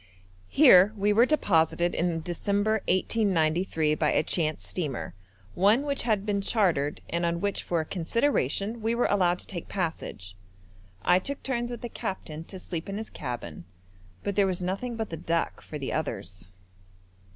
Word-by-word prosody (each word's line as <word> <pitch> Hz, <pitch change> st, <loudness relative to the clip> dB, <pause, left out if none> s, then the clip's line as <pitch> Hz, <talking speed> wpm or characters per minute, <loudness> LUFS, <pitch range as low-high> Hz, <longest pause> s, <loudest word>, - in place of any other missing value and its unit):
Here 210 Hz, -8 st, +7 dB
we 205 Hz, +1 st, +2 dB
were 235 Hz, +4 st, +5 dB
deposited 175 Hz, -, +2 dB
in 170 Hz, -1 st, 0 dB
December 205 Hz, +5 st, 0 dB
1893 175 Hz, -5 st, +1 dB
by 155 Hz, 0 st, +1 dB
a -, -, +2 dB
chance 155 Hz, -3 st, -1 dB
steamer, 145 Hz, -, -4 dB, 0.4 s
one 210 Hz, +8 st, +4 dB
which 280 Hz, -1 st, -1 dB
had 215 Hz, -4 st, 0 dB
been 205 Hz, -2 st, 0 dB
chartered 175 Hz, -9 st, +1 dB
and 170 Hz, +1 st, -2 dB
on 170 Hz, 0 st, 0 dB
which 200 Hz, +2 st, -1 dB
for 170 Hz, -2 st, 0 dB
a -, -, -5 dB
consideration 200 Hz, -, 0 dB
we 225 Hz, +2 st, 0 dB
were 245 Hz, -, +2 dB
allowed 180 Hz, -3 st, +2 dB
to -, -, -10 dB
take 175 Hz, -4 st, -7 dB
passage. 160 Hz, -, -4 dB, 0.7 s
I 180 Hz, +1 st, +5 dB
took 280 Hz, +9 st, -6 dB
turns 240 Hz, -2 st, -1 dB
with 240 Hz, -, -6 dB
the 240 Hz, -, -4 dB
captain 160 Hz, -8 st, -5 dB
to 190 Hz, -, -9 dB
sleep 175 Hz, -1 st, -5 dB
in 195 Hz, -, -3 dB
his 220 Hz, 0 st, -6 dB
cabin, 120 Hz, -, -6 dB, 0.6 s
but 200 Hz, -, -2 dB
there 200 Hz, 0 st, +4 dB
was 185 Hz, -2 st, -1 dB
nothing 195 Hz, +7 st, -3 dB
but 220 Hz, -4 st, -4 dB
the 165 Hz, -, -4 dB
deck 165 Hz, +1 st, -1 dB
for 150 Hz, -, -7 dB
the 135 Hz, -2 st, -4 dB
others. 90 Hz, -, -4 dB
185 Hz, 170 wpm, -27 LUFS, 160-215 Hz, 0.7 s, Here